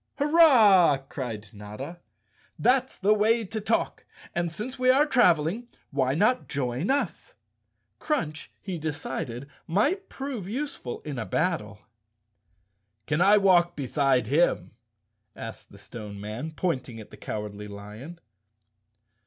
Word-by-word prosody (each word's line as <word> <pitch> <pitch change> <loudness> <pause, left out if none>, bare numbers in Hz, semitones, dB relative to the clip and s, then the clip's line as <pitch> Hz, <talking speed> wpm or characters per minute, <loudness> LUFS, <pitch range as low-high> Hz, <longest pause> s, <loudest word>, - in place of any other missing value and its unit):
"Hurrah!" 245 - +6
cried 115 -6 -5
Notta. 105 +11 -8 0.6
"That's 260 +1 +2
the 205 +2 +3
way 225 +2 +3
to 220 +3 -4
talk. 225 +2 -1 0.3
And 170 -1 -1
since 245 +9 -6
we 255 0 +3
are 275 +3 +6
traveling, 200 - +2 0.2
why 135 -1 +1
not 215 +9 +2
join 135 +3 -2
us?" 285 - -1 0.6
Crunch, 155 - -2
he 185 -4 -5
decided, 140 -4 -4 0.2
might 290 - +1
prove 260 -9 -5
useful 250 - -4
in 145 -5 -5
a 110 - -3
battle. 160 - -1 1.2
"Can 155 +3 0
I 200 +3 +6
walk 175 -3 +4
beside 135 -3 +1
him?" 130 - +1 0.6
asked 115 0 -9
the 100 - -14
Stone 100 0 -9
Man, 110 +9 -5
pointing 135 -8 -3
at 110 - -12
the - - -10
Cowardly 105 -1 -6
Lion. 105 +11 -10
165 Hz, 125 wpm, -27 LUFS, -, 1.2 s, Hurrah